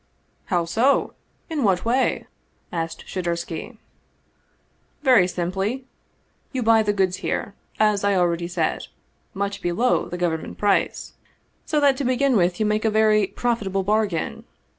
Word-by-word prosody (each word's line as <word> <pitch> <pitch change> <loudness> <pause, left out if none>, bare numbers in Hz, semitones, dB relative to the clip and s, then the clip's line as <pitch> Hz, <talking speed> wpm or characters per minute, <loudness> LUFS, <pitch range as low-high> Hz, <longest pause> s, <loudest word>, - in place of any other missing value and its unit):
" - - -42
How 175 -4 0
so? 235 +11 +2 0.3
In 320 -4 -2
what 190 -3 +2
way? 250 +3 +1 0.2
" - - -42
asked 165 0 -6
Shadursky. 170 +4 -4 0.6
" - - -41
Very 245 -10 +5
simply. 190 +8 -2 0.7
You 255 -3 -2
buy 225 0 +5
the 210 -1 +1
goods 190 -2 0
here, 200 +1 -3 0.3
as 210 -2 +3
I 200 -1 +2
already 170 -1 +1
said, 175 - -2 0.5
much 200 +1 -3
below 180 +9 +1
the 175 - -5
government 170 -3 -2
price. 205 -2 0 0.5
So 305 - +1
that 280 -2 +4
to 280 - -2
begin 255 +1 +2
with 175 -3 +2
you 215 - +2
make 210 0 +1
a 220 - +3
very 215 -1 +3
profitable 200 -5 -1
bargain. 205 -4 -1
205 Hz, 150 wpm, -23 LUFS, 180-230 Hz, 0.7 s, Very